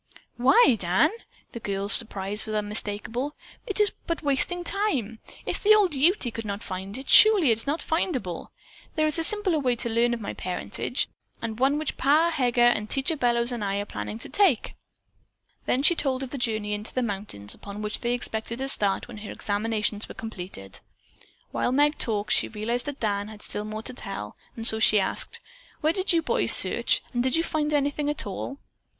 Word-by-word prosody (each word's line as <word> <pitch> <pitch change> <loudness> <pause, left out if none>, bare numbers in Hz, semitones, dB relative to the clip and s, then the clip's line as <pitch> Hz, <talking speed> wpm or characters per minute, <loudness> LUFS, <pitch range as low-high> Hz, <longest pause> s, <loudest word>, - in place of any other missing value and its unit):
"Why, 260 - +5
Dan," 185 - +2 0.4
the 235 - -7
girl's 200 -1 +2
surprise 205 -2 +3
was 215 - -3
unmistakable, 210 +6 -3 0.3
"it 410 - -1
is 420 0 +4 0.2
but 335 -1 -3
wasting 295 +5 0
time. 305 - -2 0.3
If - - -3
the 430 +1 +6
old 395 -6 +3
Ute 280 - +2
could 225 - -5
not 205 +1 -5
find 190 +4 -6
it, 265 - -9
surely 410 - +6
it 225 - 0
is 225 - -6
not 300 +4 -1
findable. 260 - -2 0.5
There 310 - +2
is 310 +1 +1
a - - 0
simpler 385 -3 +1
way 250 -4 0
to 235 - -3
learn 235 +1 +1
of - - -8
my 205 - -5
parentage, 180 -1 -3 0.3
and 225 0 -5
one 275 +3 +2
which 310 -2 -3
Pa 310 +5 +3
Heger, 240 -6 +2
Teacher 275 +4 0
Bellows 240 -3 +1
and 235 -3 -4
I 195 -1 -1
are 205 - -3
planning 105 - -6
to - - -7
undertake." 375 - +1 0.9
Then 265 - +1
she 345 - +6
told 270 -5 -1
of 260 - -7
the 280 - -4
journey 215 -3 -1
into 210 +1 -5
the 255 - 0
mountains 195 - -4
upon 205 +1 -9
which 210 +1 0
they 240 0 -1
expected 230 -1 -2
to 270 +1 -3
start 200 -7 0
when 240 -3 -10
her 210 - -9
examinations 210 0 -2
were - - -9
completed. 180 - -8 0.7
While - - -1
Meg 295 +3 +2
talked, 210 -3 +1
she - - +2
realized 230 +4 -3
that 290 -1 -6
Dan 205 -2 -1
had 215 -1 -11
still 210 - -5
more 215 +1 -6
to 255 - -6
tell, 195 - -6 0.2
and 225 - -5
so 220 -1 +4
she 215 -1 +5
asked: 190 - -2 0.4
"Where 310 +2 +2
did 380 +1 0
you 335 -2 +2
boys - - +7
search, - - +4
and 240 - 0
did 260 0 +1
you 330 - +1
find 305 -2 -2
anything 290 0 0
at 295 - 0
all?" 205 +7 -6
240 Hz, 200 wpm, -25 LUFS, 210-295 Hz, 0.9 s, boys